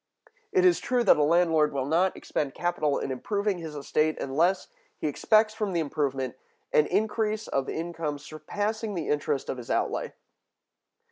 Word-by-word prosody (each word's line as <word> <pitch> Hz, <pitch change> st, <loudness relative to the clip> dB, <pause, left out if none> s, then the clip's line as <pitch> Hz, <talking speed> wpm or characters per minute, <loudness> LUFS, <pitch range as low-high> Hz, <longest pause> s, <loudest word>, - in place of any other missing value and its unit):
It 375 Hz, -3 st, +3 dB
is 360 Hz, -1 st, +5 dB
true 250 Hz, -1 st, +1 dB
that -, -, +6 dB
a -, -, +2 dB
landlord 160 Hz, -1 st, +3 dB
will 135 Hz, -2 st, -1 dB
not 170 Hz, +6 st, +2 dB
expend 140 Hz, -3 st, -3 dB
capital 155 Hz, -5 st, 0 dB
in -, -, -3 dB
improving 200 Hz, -, -1 dB
his 160 Hz, -2 st, -7 dB
estate 155 Hz, +2 st, 0 dB
unless 170 Hz, +8 st, +1 dB, 0.3 s
he -, -, -5 dB
expects 215 Hz, +8 st, +3 dB
from 210 Hz, -3 st, -2 dB
the 170 Hz, -, +1 dB
improvement 135 Hz, -4 st, -2 dB, 0.4 s
an 150 Hz, -, +5 dB
increase 215 Hz, +2 st, 0 dB
of 135 Hz, -1 st, -1 dB
income 165 Hz, -3 st, -3 dB
surpassing 205 Hz, +9 st, -4 dB
the 165 Hz, -4 st, -3 dB
interest 145 Hz, -2 st, 0 dB
of -, -, -3 dB
his 120 Hz, -, -10 dB
outlay. -, -, -1 dB
165 Hz, 160 wpm, -27 LUFS, 145-205 Hz, 0.4 s, that